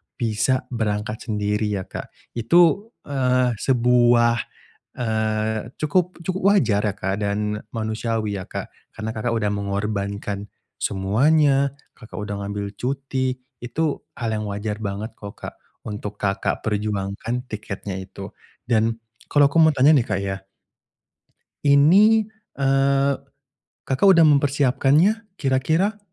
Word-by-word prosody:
bisa 120 Hz, +2 st, 0 dB
berangkat 105 Hz, -1 st, -2 dB
sendiri 105 Hz, 0 st, 0 dB
ya, 95 Hz, -, -3 dB
Kak. -, -, -7 dB, 0.2 s
Itu, 170 Hz, -, +3 dB, 0.2 s
eee, 125 Hz, -3 st, +1 dB
sebuah, 120 Hz, -2 st, +4 dB, 0.6 s
eee, 110 Hz, -1 st, -1 dB
cukup 180 Hz, +4 st, 0 dB
cukup 185 Hz, +1 st, -2 dB
wajar 105 Hz, -, +2 dB
ya, 100 Hz, -, -1 dB
Kak, 95 Hz, +1 st, -2 dB
dan 105 Hz, +1 st, -1 dB, 0.2 s
manusiawi 110 Hz, -2 st, -2 dB
ya 95 Hz, -, -8 dB
Kak, -, -, -6 dB, 0.2 s
karena 110 Hz, 0 st, -4 dB
Kakak 115 Hz, +1 st, -2 dB
udah 105 Hz, -2 st, 0 dB
mengorbankan 100 Hz, 0 st, -3 dB, 0.3 s
semuanya. 140 Hz, +8 st, +2 dB, 0.2 s
Kakak 110 Hz, -, -14 dB
udah 105 Hz, -1 st, -4 dB
ngambil 100 Hz, 0 st, -4 dB
cuti, 130 Hz, 0 st, -1 dB, 0.2 s
itu 125 Hz, +7 st, -3 dB, 0.3 s
hal 115 Hz, -4 st, -2 dB
yang 105 Hz, -, -4 dB
wajar 105 Hz, +1 st, -4 dB
banget 100 Hz, +3 st, -4 dB
kok, 100 Hz, -1 st, -8 dB
Kak, -, -, -7 dB, 0.3 s
untuk 105 Hz, 0 st, -5 dB
Kakak 100 Hz, -1 st, -1 dB
perjuangkan 105 Hz, +3 st, -2 dB
tiketnya 100 Hz, -2 st, -5 dB
itu. 95 Hz, +1 st, -9 dB, 0.3 s
Dan 115 Hz, -1 st, +1 dB, 0.3 s
kalau 145 Hz, -1 st, +5 dB
aku 165 Hz, -, +3 dB
mau 160 Hz, -1 st, +7 dB
tanya 135 Hz, +4 st, +6 dB
nih, 125 Hz, -, +2 dB
Kak, 95 Hz, -1 st, -1 dB
ya. 95 Hz, 0 st, -4 dB, 1.2 s
Ini, 190 Hz, +10 st, +6 dB, 0.3 s
eee, 135 Hz, 0 st, +3 dB, 0.7 s
Kakak 130 Hz, +9 st, +1 dB
udah 165 Hz, -, +6 dB
mempersiapkannya 145 Hz, -, +3 dB
kira-kira 160 Hz, +9 st, +1 dB
115 Hz, 120 wpm, -22 LUFS, 105-140 Hz, 1.2 s, mau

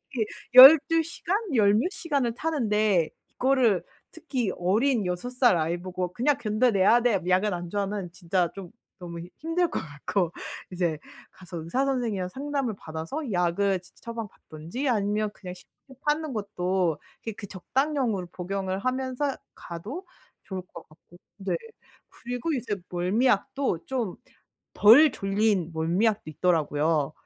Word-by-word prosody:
특히 230 Hz, -5 st, -3 dB, 0.3 s
12 300 Hz, +5 st, +10 dB
시간? 340 Hz, +4 st, -2 dB, 0.2 s
10 200 Hz, -2 st, +5 dB
몇 235 Hz, +11 st, +2 dB
시간을 285 Hz, -10 st, -1 dB
타는데 215 Hz, -, +1 dB, 0.3 s
이거를 250 Hz, -7 st, +2 dB, 0.3 s
특히 265 Hz, -, -3 dB
어린 215 Hz, +4 st, +1 dB
6 180 Hz, +8 st, -3 dB
살 250 Hz, -7 st, +4 dB
아이보고 180 Hz, +2 st, -2 dB
"그냥 275 Hz, +6 st, +1 dB
견뎌내야 215 Hz, 0 st, +3 dB
돼. 230 Hz, -5 st, +2 dB
약은 185 Hz, +2 st, +2 dB
안 175 Hz, -1 st, -6 dB
좋아." 205 Hz, +1 st, -1 dB
하면 195 Hz, -3 st, -4 dB
진짜 180 Hz, -1 st, 0 dB
좀 195 Hz, -3 st, -9 dB, 0.3 s
너무 170 Hz, -2 st, -8 dB, 0.2 s
힘들 330 Hz, +2 st, 0 dB
것 -, -, -2 dB
같고. 165 Hz, +4 st, -2 dB, 0.4 s
이제 170 Hz, -4 st, -1 dB, 0.3 s
가서 185 Hz, -1 st, -11 dB
의사 250 Hz, +12 st, 0 dB
선생이랑 225 Hz, -9 st, -1 dB
상담을 275 Hz, -1 st, -3 dB
받아서 165 Hz, -, -5 dB
약을 180 Hz, +2 st, +1 dB
치치 180 Hz, -, -22 dB
처방 230 Hz, -2 st, -5 dB
받든지 170 Hz, -, -6 dB
아니면 210 Hz, -1 st, 0 dB
그냥 180 Hz, -2 st, -8 dB
시중에 265 Hz, +8 st, -19 dB
파는 300 Hz, 0 st, 0 dB
것도 185 Hz, -5 st, -1 dB, 0.3 s
그 225 Hz, -, -3 dB
그 220 Hz, -, -7 dB
적당량으로 235 Hz, 0 st, -1 dB
복용을 190 Hz, +1 st, -3 dB
하면서 260 Hz, +4 st, -1 dB, 0.2 s
가도 220 Hz, -, -8 dB, 0.4 s
좋을 190 Hz, -2 st, -5 dB
것 170 Hz, -2 st, -13 dB
같고. 160 Hz, +2 st, -20 dB, 0.2 s
네. 195 Hz, -, -1 dB, 0.5 s
그리고 245 Hz, +6 st, -4 dB
이제 235 Hz, -7 st, -2 dB
멀미약도 210 Hz, +3 st, 0 dB
좀 240 Hz, -8 st, -2 dB, 0.6 s
덜 260 Hz, +9 st, +8 dB
졸린 195 Hz, -3 st, 0 dB
멀미약도 180 Hz, +7 st, +1 dB
있더라고요. 155 Hz, -3 st, +1 dB
205 Hz, 280 characters per minute, -26 LUFS, 180-255 Hz, 0.6 s, 12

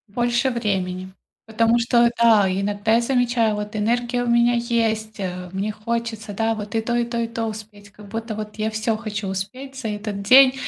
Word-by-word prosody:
Больше 240 Hz, +2 st, +1 dB
времени, 190 Hz, -5 st, -2 dB, 0.3 s
потому 230 Hz, +1 st, +2 dB
что, 235 Hz, 0 st, +4 dB
да, 220 Hz, -4 st, +6 dB
иногда 205 Hz, +3 st, 0 dB
я 235 Hz, -, +4 dB
замечаю, 240 Hz, -3 st, +1 dB
вот 210 Hz, +1 st, -5 dB
энергия 240 Hz, +3 st, 0 dB
у 240 Hz, -, -2 dB
меня 235 Hz, 0 st, +4 dB
есть, 225 Hz, -2 st, -1 dB
э, 180 Hz, -2 st, -5 dB
мне 200 Hz, +3 st, -2 dB
хочется, 225 Hz, 0 st, -4 dB
да, 225 Hz, +2 st, 0 dB
вот 210 Hz, +1 st, -5 dB
и -, -, +3 dB
то, 240 Hz, +1 st, -2 dB
и 240 Hz, 0 st, +2 dB
то, 235 Hz, 0 st, -4 dB
и 230 Hz, -, 0 dB
то 230 Hz, 0 st, -3 dB
успеть. 210 Hz, -1 st, -9 dB
Как 210 Hz, 0 st, -14 dB
будто, 225 Hz, 0 st, -5 dB
вот, 210 Hz, -1 st, -6 dB
я 215 Hz, 0 st, -1 dB
всё 220 Hz, 0 st, -1 dB
хочу 215 Hz, -2 st, -5 dB
успеть 205 Hz, +9 st, -5 dB
за 260 Hz, -4 st, -5 dB
этот 210 Hz, -1 st, -4 dB
день. 260 Hz, +5 st, +7 dB
220 Hz, 195 wpm, -22 LUFS, 210-235 Hz, 0.3 s, день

